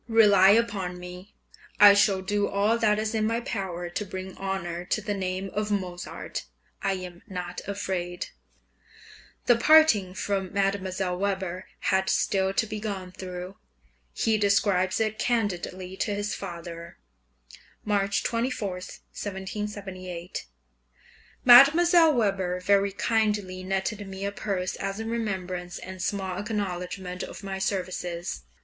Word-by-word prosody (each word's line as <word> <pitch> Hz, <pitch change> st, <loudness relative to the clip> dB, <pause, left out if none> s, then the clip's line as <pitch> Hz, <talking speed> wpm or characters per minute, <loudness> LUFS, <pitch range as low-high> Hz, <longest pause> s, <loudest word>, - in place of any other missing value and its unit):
Rely 205 Hz, -4 st, +6 dB
upon 200 Hz, -5 st, +2 dB
me, 180 Hz, +2 st, -10 dB, 0.4 s
I 205 Hz, 0 st, +10 dB
shall 200 Hz, -1 st, +3 dB
do 205 Hz, +1 st, 0 dB
all 205 Hz, +3 st, +2 dB
that 210 Hz, -2 st, +3 dB
is 215 Hz, +1 st, -1 dB
in 215 Hz, -1 st, +1 dB
my 230 Hz, +1 st, 0 dB
power 190 Hz, -7 st, -4 dB
to 175 Hz, +4 st, -3 dB
bring 190 Hz, -1 st, -7 dB
honour 180 Hz, -3 st, -3 dB
to 205 Hz, -, 0 dB
the 210 Hz, 0 st, -3 dB
name 190 Hz, 0 st, -3 dB
of 210 Hz, 0 st, -1 dB
Mozart; 180 Hz, -, -4 dB, 0.3 s
I 195 Hz, -, +1 dB
am 180 Hz, -2 st, -7 dB
not 180 Hz, -3 st, -5 dB
afraid. 180 Hz, -3 st, -3 dB, 1.2 s
The 240 Hz, -, +6 dB
parting 235 Hz, -10 st, +5 dB
from 195 Hz, -1 st, -1 dB
Mdlle. 190 Hz, -2 st, -1 dB
Weber 190 Hz, -2 st, -2 dB, 0.2 s
had 190 Hz, 0 st, +2 dB
still 190 Hz, -1 st, +2 dB
to 195 Hz, -, +1 dB
be 215 Hz, 0 st, -5 dB
gone 195 Hz, -4 st, -4 dB
through; 185 Hz, +1 st, -7 dB, 0.5 s
he 220 Hz, -, +1 dB
describes 200 Hz, -2 st, +2 dB
it 215 Hz, -1 st, -1 dB
candidly 190 Hz, -5 st, -1 dB
to 205 Hz, 0 st, -1 dB
his 205 Hz, +1 st, -2 dB
father 170 Hz, -2 st, -7 dB, 0.9 s
(March 200 Hz, -1 st, +1 dB
24, 230 Hz, -2 st, -1 dB
1778) 190 Hz, -1 st, -6 dB, 1.0 s
Mdlle. 320 Hz, +6 st, +8 dB
Weber 195 Hz, -5 st, 0 dB
very 200 Hz, +1 st, +3 dB
kindly 205 Hz, -2 st, 0 dB
netted 195 Hz, +2 st, -2 dB
me 195 Hz, 0 st, -5 dB
a 200 Hz, -, -1 dB
purse 195 Hz, -3 st, -2 dB
as 195 Hz, +1 st, -3 dB
a 220 Hz, -, -4 dB
remembrance 185 Hz, -6 st, -3 dB
and 185 Hz, 0 st, -8 dB
small 190 Hz, -2 st, -2 dB
acknowledgment 185 Hz, -3 st, -4 dB
of -, -, -7 dB
my 195 Hz, -1 st, -4 dB
services. 180 Hz, -, -3 dB
195 Hz, 130 wpm, -27 LUFS, 185-210 Hz, 1.2 s, I